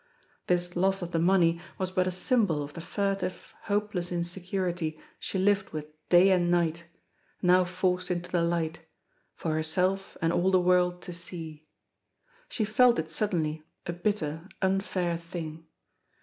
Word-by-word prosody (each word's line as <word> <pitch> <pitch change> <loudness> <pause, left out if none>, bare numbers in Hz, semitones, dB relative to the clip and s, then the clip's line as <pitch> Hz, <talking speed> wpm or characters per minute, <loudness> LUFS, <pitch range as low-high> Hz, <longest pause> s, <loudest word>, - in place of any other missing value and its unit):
This 175 0 +1
loss 190 +1 +2
of 175 - -5
the 165 - +1
money 170 -1 +3 0.2
was 185 -1 -2
but 185 -1 +1
a - - 0
symbol 185 - +1
of 145 0 -8
the 165 - -7
furtive, 195 +1 -2
hopeless 205 -4 -1
insecurity 175 -2 -2 0.2
she - - -3
lived 195 +1 +2
with 155 -1 -4 0.2
day 180 +2 +7
and 175 -2 +3
night, 170 -1 +1 0.6
now 180 0 +5
forced 180 0 0
into 175 0 -3
the 175 - +2
light, 170 -1 0 0.6
for 160 - -2
herself 180 +5 0
and 165 0 +1
all 185 +2 +3
the 185 -1 +5
world 180 0 +2
to 180 - -6
see. 165 -3 -6 0.9
She 220 - -1
felt 235 +3 +5
it 160 0 -2
suddenly 160 -5 0 0.2
a 175 - -2
bitter, 175 -2 -2
unfair 190 -3 0
thing. 165 -2 -7
180 Hz, 150 wpm, -28 LUFS, 165-190 Hz, 0.9 s, day